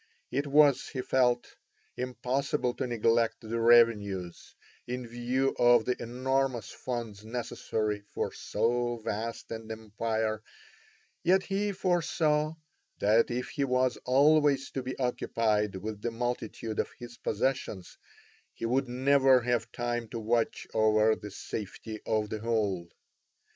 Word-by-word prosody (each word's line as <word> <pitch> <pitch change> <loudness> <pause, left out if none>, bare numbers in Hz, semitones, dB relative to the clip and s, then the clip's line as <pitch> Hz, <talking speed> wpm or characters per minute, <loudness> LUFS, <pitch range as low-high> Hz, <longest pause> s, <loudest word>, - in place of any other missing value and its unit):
It 145 +1 -1
was, 145 -1 +5
he 130 - -3
felt, 125 -2 +2 0.5
impossible 125 +1 -1
to 130 - -3
neglect 115 -1 +1
the 115 +1 -3
revenues, 105 -7 +3 0.3
in 125 0 -4
view 120 +3 -1
of 120 -2 +6
the 125 - +1
enormous 130 0 -1
funds 115 -5 -5
necessary 110 -2 -2
for - - -3
so 120 +1 0
vast 115 +1 -4
an 110 0 -6
empire, 110 0 -2 0.8
yet 185 +2 +3
he 205 +1 -1
foresaw 160 -4 +1 0.4
that 110 +3 +3
if 125 +1 -3
he 140 - -2
was 125 -1 +1
always 140 +1 +4
to 135 - -3
be 130 +1 -5
occupied 110 -5 0
with 105 +2 -5
the 120 - -1
multitude 115 -2 -3
of - - 0
his 120 -1 -10
possessions 110 -5 -2 0.6
he - - -4
would 130 +2 +1
never 130 0 +4
have 120 -1 -1
time 120 -1 -2
to 115 - -5
watch 115 +1 0
over 110 0 +4
the 105 - -8
safety 110 +2 -6
of 110 -1 0
the 110 - -3
whole. 105 -6 -1
120 Hz, 130 wpm, -29 LUFS, 110-130 Hz, 0.8 s, of